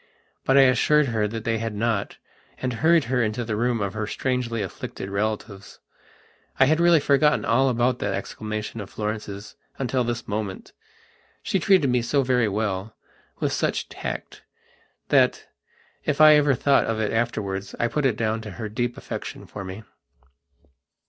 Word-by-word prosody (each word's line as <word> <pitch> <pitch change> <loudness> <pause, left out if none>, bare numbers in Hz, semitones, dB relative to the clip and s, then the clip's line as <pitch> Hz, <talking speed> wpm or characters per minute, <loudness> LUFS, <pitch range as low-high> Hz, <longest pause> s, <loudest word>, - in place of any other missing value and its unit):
But 135 - +4
I - - +9
assured 135 +3 +4
her 110 -2 0
that 110 +1 -5
they 115 -1 0
had 115 -1 -3
not 110 -1 -1 0.4
and 130 -1 -2
hurried 160 +7 +4
her 125 +1 0
into 115 +2 -1
the 110 -1 -2
room 120 +1 0
of 100 -1 -2
her 110 -1 -3
strangely 120 -3 -1
afflicted 95 +1 -7
relatives. 105 -1 -3 0.8
I 135 - +7
had 155 +4 +2
really 170 -1 +5
forgotten 150 +1 +3
all 130 +4 +3
about 125 +1 +1
that 100 -1 -1
exclamation 110 +2 -5
of 100 - -8
Florence's 105 -1 -5 0.2
until 130 -1 0
this 120 0 -3
moment. 105 -2 -4 0.7
She 195 - 0
treated 165 -6 +4
me 125 -1 +2
so 140 +4 +1
very 125 -3 +2
wellwith 105 0 -4
such - - -1
tactthat, - - -3 0.6
if 150 -1 -1
I 155 0 +9
ever 145 -2 +4
thought 140 +3 +3
of 115 -1 -2
it 110 0 -1
afterwards 100 -4 -2
I 120 - +2
put 145 +3 +1
it 115 -5 -1
down 110 0 -1
to 105 -1 -8
her 110 -2 -4
deep 120 +3 -2
affection - - -7
for 100 - -8
me. 95 +3 -8
115 Hz, 160 wpm, -24 LUFS, 105-130 Hz, 0.8 s, I